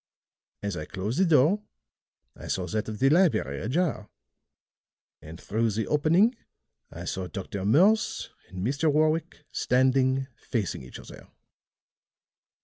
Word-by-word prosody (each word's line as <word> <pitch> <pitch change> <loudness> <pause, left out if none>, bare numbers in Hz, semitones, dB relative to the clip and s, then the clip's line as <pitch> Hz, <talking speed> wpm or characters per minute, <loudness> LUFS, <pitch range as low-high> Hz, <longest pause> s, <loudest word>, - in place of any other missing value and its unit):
As 100 -2 -2
I 75 - -5
closed 105 - -3
the 190 - +5
door, 165 +5 +4 0.7
I - - -10
saw 90 - -1
that 105 +5 -3
of 110 - -5
the 135 +5 +3
library 155 - +2
ajar; 145 -2 -1 1.1
and 80 +2 -11
through 115 +2 0
the 110 +1 -2
opening 165 - +3 0.6
I - - -8
saw 95 -1 -3
Dr. 95 0 -5
Morse 190 - +3 0.2
and 95 +1 -5
Mr. 145 +5 +1
Warwick 155 0 0
standing 130 +1 +2
facing 110 -5 -3
each 65 - -10
other. - - -12
130 Hz, 130 wpm, -27 LUFS, 100-155 Hz, 1.1 s, the